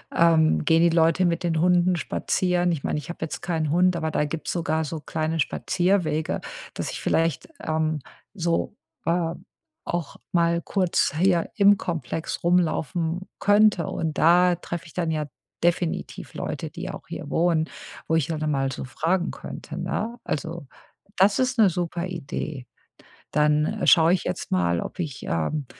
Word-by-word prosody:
ähm, 160 -2 +4
gehen 165 0 +4
die 170 - +5
Leute 165 +2 +4
mit 170 0 0
den 165 -2 +1
Hunden 180 0 +4
spazieren. 180 +1 0
Ich 155 -5 -3
meine, 150 - -1
ich 150 - -11
habe 175 - -6
jetzt 160 - -4
keinen 160 -4 -1
Hund, 180 +1 +3
aber 160 -2 -2
da 150 - +1
gibt's 155 +2 -4
sogar 160 -2 0
so 155 +1 -4
kleine 160 +1 -2
Spazierwege, 175 -1 0 0.3
dass - - -4
ich - - -6
vielleicht, 165 -3 +1
ähm, 155 -1 0 0.3
so, 170 +1 -1 0.3
äh, 165 -1 +1 0.5
auch 170 -4 -3
mal 170 -1 +2
kurz 185 -5 +1
hier 175 -1 +2
im 200 0 +6
Komplex 165 -1 -4
rumlaufen 175 0 +1 0.2
könnte. 205 -4 +4
Und 160 -2 -3
da 175 +2 +5
treffe 170 -1 -6
ich 160 - -14
dann 170 -3 -1
ja 155 -1 -1 0.4
definitiv 175 -1 -1
Leute, - - -4
die - - -6
auch - - -8
hier - - -7
wohnen, 165 -2 +2 0.4
wo 160 - +2
ich 160 -1 +1
ja 160 - -1
dann 155 0 -1
mal 135 -1 0
so - - -5
fragen 170 +7 0
könnte, - - -8
ne? 235 +3 -3
Also, 160 0 -4 0.5
das 195 +4 +4
ist 255 -1 +1
'ne 215 -3 +6
super 175 0 -2
Idee. 155 -5 -5 0.7
Dann 150 0 +2
schaue 165 +2 +6
ich 185 - -2
jetzt - - -4
mal, 85 -2 +1
ob - - -7
ich, 155 -7 -4
ähm, 105 - -1
165 Hz, 165 wpm, -25 LUFS, 155-180 Hz, 0.7 s, im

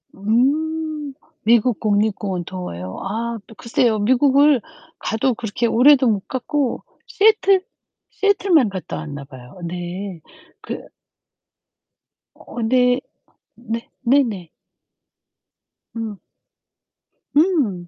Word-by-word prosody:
음. 295 +7 0 0.3
미국 235 0 +3
국립공원 205 -4 0
더워요. 95 - -6
아 230 +4 -3
또 225 - -14
글쎄요. 230 -1 +1
미국을 270 +4 +4 0.4
가도 225 +4 0
그렇게 225 +1 -3
오래도 255 +3 +5
못 205 -3 0
갔고 265 0 -2 0.2
시애틀 395 -3 +3 0.5
시애틀만 380 - +3
갔다 190 -2 -6
왔나 145 -2 -7
봐요. 130 +4 -13
네. 175 0 -6 0.4
그 - - -6 1.5
어 240 - -8
네. 250 +2 +3 0.6
네. 230 -1 -6
네네. 235 - +1 1.5
음. 220 -3 -4 1.2
음. 280 - +2
230 Hz, 170 characters per minute, -21 LUFS, 195-280 Hz, 1.5 s, 오래도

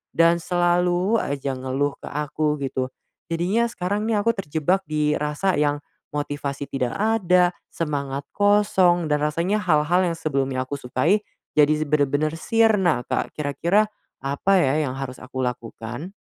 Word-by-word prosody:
dan 170 +1 +4
selalu 175 +4 +2
aja 140 -4 -2
ngeluh 130 +2 -2
ke - - -9
aku 150 +1 -1
gitu. 130 -1 -2 0.4
Jadinya 180 +8 +1
sekarang 205 -2 -2
nih 220 -2 +1
aku 230 +2 +1
terjebak 180 +2 0
di 150 -1 0
rasa 150 +5 0
yang 145 0 +1 0.3
motivasi 145 -1 -3
tidak 130 -3 -1
ada, 185 -5 +3 0.2
semangat 140 -4 -2
kosong 190 -5 +3
dan 150 - +3
rasanya 170 +7 0
hal-hal 175 -1 +2
yang 170 - 0
sebelumnya 135 -5 -1
aku 130 +2 -4
sukai 145 +11 +1 0.3
jadi 150 0 +6
z 155 -1 -2
bener-bener 150 +2 +1
sirna, 205 - +3
Kak. - - -1
Kira-kira 170 +8 +1 0.3
apa 140 +8 0
ya 150 +2 +2
yang 130 - -3
harus 135 -1 -6
aku 130 0 -6
lakukan? 120 - -5
155 Hz, 145 wpm, -23 LUFS, 140-180 Hz, 0.4 s, jadi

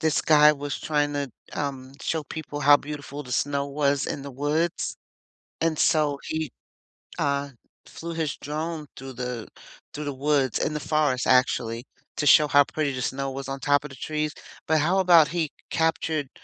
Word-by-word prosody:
this 160 -1 +2
guy 150 -1 +6
was 145 -1 -4
trying 145 -1 0
to, 140 -2 -2 0.2
um, 135 -2 -4
show 160 -2 -1
people 145 -1 -6
how 145 0 +7
beautiful 145 0 -7
the 125 - -8
snow 140 +2 0
was 140 -1 0
in - - -3
the 140 - -7
woods, 150 +6 -1 0.7
and 165 -2 +1
so, 150 -3 +2
he, 155 -3 -3 0.7
uh, 140 0 0 0.4
flew 170 0 -7
his 160 -3 -2
drone 155 +1 -4
through 135 0 -8
the 125 -2 -5 0.5
through 150 0 -5
the 145 - -3
woods 140 -2 +1
in 150 - -1
the 150 - -2
forest 150 -4 +1
actually, 120 -1 +2 0.3
to 145 - 0
show 150 0 +7
how 145 0 +6
pretty 145 -1 -2
the 125 - -4
snow 135 +2 -2
was 135 0 -6
on 135 0 -4
top 145 +2 +2
of 150 - -7
the 135 - -11
trees, 155 +2 -2 0.3
but 160 0 +3
how 180 +6 +2
about 170 -5 +6
he 165 -3 -2 0.2
captured, 160 -3 0
145 Hz, 180 wpm, -25 LUFS, 140-155 Hz, 0.7 s, how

